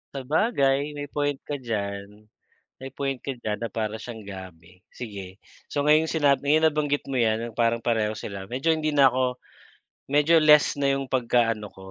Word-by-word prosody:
Sabagay, 140 - +1
may 145 0 -5
point 145 -1 0
ka 145 -2 -5
diyan. 105 -3 -5 0.6
May 135 - -6
point 135 -2 -2
ka 140 - -4
diyan 105 -2 -3
na 115 - -3
para 110 0 -3
siyang 115 -3 -8
gabi. 90 -2 -11
Sige, 100 -5 -8 0.3
so 145 - -1
ngayong 155 +1 +4
sinab 145 -4 +2
ayan, 155 +3 +3
nabanggit 145 -2 0
mo 135 - -5
'yan, 110 -1 +2
yung 110 - -20
parang 115 0 +2
pareho 110 -2 0
sila, 95 -1 -7
medyo 140 +6 +1
hindi 155 -1 -1
na 140 -3 +5
ako 125 0 -1 0.7
medyo 150 +3 +4
less 150 -2 +6
na 140 -1 +1
'yong 135 -1 -2
pagkaano 115 -4 0
ko, 95 0 -14
130 Hz, 175 wpm, -25 LUFS, 110-145 Hz, 0.7 s, less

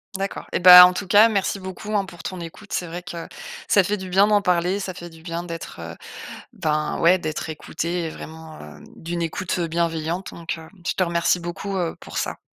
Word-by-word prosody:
D'accord, 195 +1 -4
et - - 0
bah, 180 0 +11
en 180 - -1
tout 200 - -4
cas 210 +3 +7
merci 200 -1 -1
beaucoup 190 +3 -6
hein, 200 -1 +1
pour 175 -2 -12
ton 185 - -5
écoute, 170 +5 -10
c'est 175 - -1
vrai 175 +2 -7
que, 170 -1 -7 0.4
ça 200 - +5
fait 205 +3 -1
du 190 -1 -7
bien 195 +2 +5
d'en 210 -1 +3
parler. 180 +1 +1
Ça 190 -2 -4
fait 175 -1 -9
du 165 -1 -16
bien 170 0 -5
d'être, 165 - -8
heu 85 0 -7 0.6
ben 155 -1 -1
ouais 175 +3 +5
d'être 155 -2 -4
écoutée 165 +2 -3
et - - -3
vraiment 160 0 -10
hem, 75 0 -12
d'une 170 +1 -5
écoute, 175 +3 -2
heu, 170 - 0
bienveillante 165 +2 -2
donc 170 0 -5
heu, 160 - -11 0.2
je - - +1
te 185 - +1
remercie 170 0 +1
beaucoup, 175 +4 -5
heu, 175 -3 -1
pour - - -8
ça. - - -3
175 Hz, 225 wpm, -23 LUFS, 165-190 Hz, 0.6 s, bah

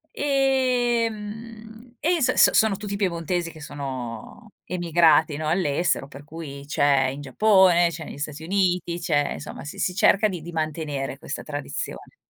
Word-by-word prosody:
E 255 -4 +2
mhmm, 220 +2 -10
e 345 +3 +2
s 255 0 +3
s - - +6
sono 220 -2 +4
tutti 205 -1 -5
piemontesi 175 -3 -1
che 155 - -13
sono 135 - -7
emigrati, 165 -3 +3
no, 155 - -3
all'estero 160 -3 0
per 140 +1 -12
cui 145 -2 -8
c'è 140 -2 +2
in 140 +2 -6
Giappone, 180 - +4
c'è 165 -1 -7
nei - - -9
Stati 150 +1 -5
Uniti, 180 -2 0
c'è 145 -4 0
insomma, - - -8
si 150 - -8
si 180 - -1
cerca 200 +3 +4
di 180 -5 -5
di 170 +2 -8
mantenere 155 -4 -3
questa 145 - -6
tradizione. 145 - -6
170 Hz, 155 wpm, -24 LUFS, 145-210 Hz, -, s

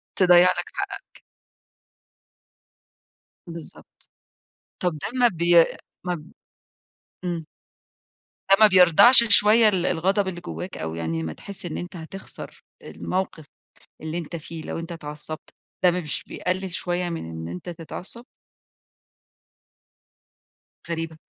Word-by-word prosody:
تضيّع 180 -1 +6
لك - - -4
حقك. - - -6 2.3
بالضبط، 165 -1 -9 0.7
طب 180 -2 0
ده - - -4
ما 245 - +6
بي 170 -3 +5 0.4
ما 180 -1 -1
ب 155 +1 -12 0.9
امم. 170 -3 -3 1.1
ده 195 - +9
ما 215 - +9
بيردعش 190 +6 +7
شوية 215 +2 +7
ال 185 -3 0
الغضب 190 +4 +1
اللي 175 -2 -5
جواك، 185 - -7
أو 80 +1 -4
يعني 80 0 -3
ما 80 -1 -4
تحس 200 - -6
إن 165 - -4
أنت 175 +1 -7
هتخسر 175 +4 -8 0.2
الموقف 185 -4 -4 0.6
اللي 160 +2 -4
أنت 170 0 -6
فيه 160 0 -7
لو - - -5
أنت 165 +1 -7
اتعصبت، 150 -1 -7 0.3
ده 180 - +6
مش 170 -6 -3
بيقلل 185 0 -3
شوية 175 0 -2
من 165 - -5
إن 80 0 -6
أنت 90 - -7
تتعصب؟ 175 +8 -7 2.6
غريبة. 165 -1 -4
175 Hz, 120 wpm, -24 LUFS, 160-185 Hz, 2.6 s, ده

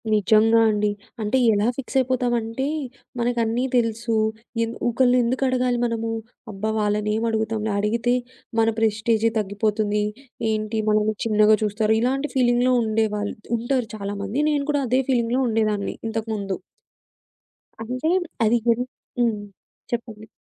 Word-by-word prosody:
నిజంగా 215 +2 +4
అండి. 210 -1 +1 0.3
అంటే 215 +5 +1 0.2
ఎలా 205 +2 +2
ఫిక్స్ 270 0 -3
అయిపోతామంటే 245 -1 0 0.5
మనకు 240 0 0
అన్నీ 230 +3 0
తెలుసు. 230 0 0 0.5
ఎన్ 230 0 -3 0.2
ఒకళ్ళని 250 +1 +3
ఎందుకు 255 +3 0
అడగాలి 250 -1 +1
మనము? 230 -1 -2 0.4
అబ్బా! 210 +2 -3
వాళ్ళనేమడుగుతాంలే! 215 +1 0
అడిగితే 235 +4 +1 0.5
మన 225 - +4
ప్రెస్టీజే 220 +1 +2
తగ్గిపోతుంది. 210 +1 0 0.5
ఏంటి 215 +1 -1
మనల్ని 215 0 +2
చిన్నగా 215 -1 +5
చూస్తారు. 215 +1 +1
ఇలాంటి 270 +4 0
ఫీలింగ్‌లో 245 0 +3
ఉండేవాళ్ళు 215 -2 -1 0.2
ఉంటారు 240 +1 -1
చాలామంది. 200 +3 -3
నేను 290 -2 +1
కూడా 290 -1 +1
అదే 255 +3 +3
ఫీలింగ్‌లో 245 0 +2
ఉండేదాన్ని 215 -2 0
ఇంతకుముందు. 220 -3 -3 1.2
అంటే 255 +7 -2 0.4
అది 230 +2 +4
గున్ 235 +1 +3 0.4
హ్మ్. 230 -3 +2 0.5
చెప్పండి? 225 -2 -5
225 Hz, 120 wpm, -23 LUFS, 215-240 Hz, 1.2 s, చిన్నగా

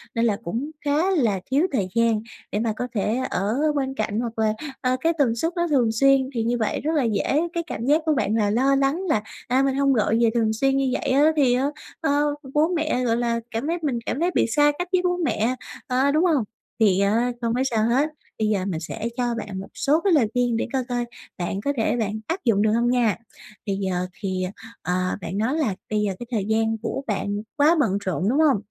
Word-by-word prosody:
nên 230 0 +2
là 210 -3 +1
cũng 240 - -3
khá 300 +6 +2
là 235 - +2
thiếu 295 +7 +3
thời 205 -9 0
gian 230 -2 +2 0.3
để 205 - -1
mà 225 -1 0
có 245 - -3
thể 210 +3 0
ở 200 +4 -1 0.2
bên 270 -2 -1
cạnh, 215 -2 -1
hoặc 230 -1 -4
là, 215 -1 +2 0.3
ờ, 255 0 +1
cái 330 +1 +2
tần 255 -6 +2
suất 325 +9 -1
nó 345 -1 0
thường 255 -8 +2
xuyên, 270 +3 +3
thì 230 -2 -1
như 240 +2 0
vậy 220 -2 -1
rất 310 - -1
là 290 - +2
dễ 230 +6 +1
cái 340 - -1
cảm 230 -6 -4
giác 300 +4 +3
của 315 - +3
bạn 215 -4 0
là 210 -2 +2
lo 260 +6 +3
lắng 275 +5 +1
là, 265 -9 +2 0.3
à, 255 +2 +2
"Mình 270 -1 +1
hông 275 0 +3
gọi 225 -1 +2
về 230 - +5
thường 225 -2 +1
xuyên 270 +4 +1
như 270 -1 +1
vậy - - -3
á, 290 +4 +5
thì 265 -4 +4
á, 255 +2 +1 0.4
ờ, 290 -1 +1 0.2
bố 300 +2 +4
mẹ, 310 -6 0
gọi 230 -1 +2
là, 235 -1 0
cảm 225 +6 -3
thấy 335 +2 0
mình 275 -6 -1
cảm 265 - -2
thấy 350 +2 +1
bị - - +3
xa 295 +5 +4
cách 355 - -2
với 370 -1 +3
bố 355 -1 +1
mẹ" 255 -8 0 0.3
ờ, 260 +2 +2
đúng 310 +5 +3
hông? 305 -9 +3 0.4
Thì 200 -4 +4
á, 225 +5 +2
không 230 -1 0
có 255 - 0
sao 225 -5 +1
hết. 275 +6 +2 0.3
Bây 215 - +1
giờ 200 -3 0
mình 180 -5 -2
sẽ 210 +7 -6
cho 250 - 0
bạn 210 -4 -5
một 195 - -7
số 295 +4 +1
cái 395 -3 +3
lời 270 -8 +4
khuyên 245 -2 +1
để - - -1
coi 265 -1 +1
coi 245 -1 -1 0.3
bạn 180 +2 -3
có 285 - +1
thể 225 - +1
bạn 215 -1 -2
áp 335 +4 -1
dụng 215 -4 +3
được 215 0 +3
hông 235 +2 +2
nha. 240 -4 +2 0.5
Bây 200 -2 -1
giờ 185 -2 -1
thì, 185 -2 -2 0.4
ờ, 180 - -2 0.3
bạn 170 +3 -4
nói 225 +7 0
là 245 -12 0
bây 215 - 0
giờ 205 -2 0
cái 240 - -6
thời 215 -5 -1
gian 225 +1 +1
của 235 +4 -3
bạn 205 -1 -1 0.2
quá 300 +4 +4
bận 210 -9 +2
rộn, 185 +1 0
đúng 270 +5 +2
hông? 300 -7 +4
240 Hz, 245 wpm, -23 LUFS, 215-280 Hz, 0.5 s, về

